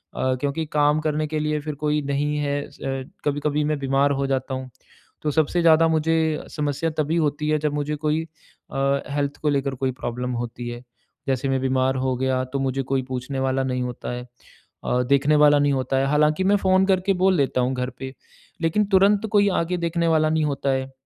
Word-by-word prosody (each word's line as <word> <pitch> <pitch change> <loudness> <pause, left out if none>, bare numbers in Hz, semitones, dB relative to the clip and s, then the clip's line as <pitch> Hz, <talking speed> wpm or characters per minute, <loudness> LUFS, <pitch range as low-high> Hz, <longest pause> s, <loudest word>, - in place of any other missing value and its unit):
अ, 130 0 0
क्योंकि 145 +3 -1
काम 150 0 +3
करने 155 0 -1
के 155 0 -2
लिए 150 0 -1
फिर 150 0 -5
कोई 150 0 +1
नहीं 145 +1 -1
है। 145 -1 -1
स - - -19
अ, 135 0 -3 0.2
कभी-कभी 145 +1 0
मैं 150 0 0
बीमार 135 +1 +2
हो 140 0 0
जाता 135 0 -2
हूँ, 130 0 -5 0.5
तो 150 - 0
सबसे 160 +4 +1
ज़्यादा 165 -1 +5
मुझे 160 0 +1 0.4
समस्या 150 +2 -1
तभी 155 +1 0
होती 150 -1 0
है। 155 - +3
जब 150 -1 -1
मुझे 150 +1 -2
कोई 155 +2 +1 0.5
अ, 140 0 +1
हेल्थ 140 0 -2
को 150 - +1
लेकर 140 -1 0
कोई 130 0 -1
प्रॉब्लम 125 +1 -3
होती 120 0 -6
है। 120 +1 -7 0.4
जैसे 135 0 0
मैं 135 0 +1
बीमार 130 0 +1
हो 130 0 0
गया 130 0 0
तो 140 - 0
मुझे 135 0 -1
कोई 135 +1 0
पूछने 130 +1 -4
वाला 135 0 0
नहीं 125 -1 -2
होता 125 -1 -5
है 125 0 -5 0.6
अ, 125 0 +1
देखने 140 +2 +4
वाला 145 0 +5
नहीं 145 0 +2
होता 135 0 -1
है। 135 - +2
हालाँकि 150 +4 +2
मैं 200 +2 +4
फ़ोन 190 -1 +3
करके 190 0 +2
बोल 190 -1 +4
देता 135 -3 +1
हूँ 125 +1 0
घर 125 0 -2
पे, 130 0 -6 0.5
लेकिन 170 +6 +2
तुरंत 200 +2 +4
कोई 205 -1 +4
आके 175 +2 -2
देखने 170 0 0
वाला 155 -1 +3
नहीं 155 0 +1
होता 140 -1 -1
है। 130 0 -2
145 Hz, 210 wpm, -23 LUFS, 130-155 Hz, 0.6 s, ज़्यादा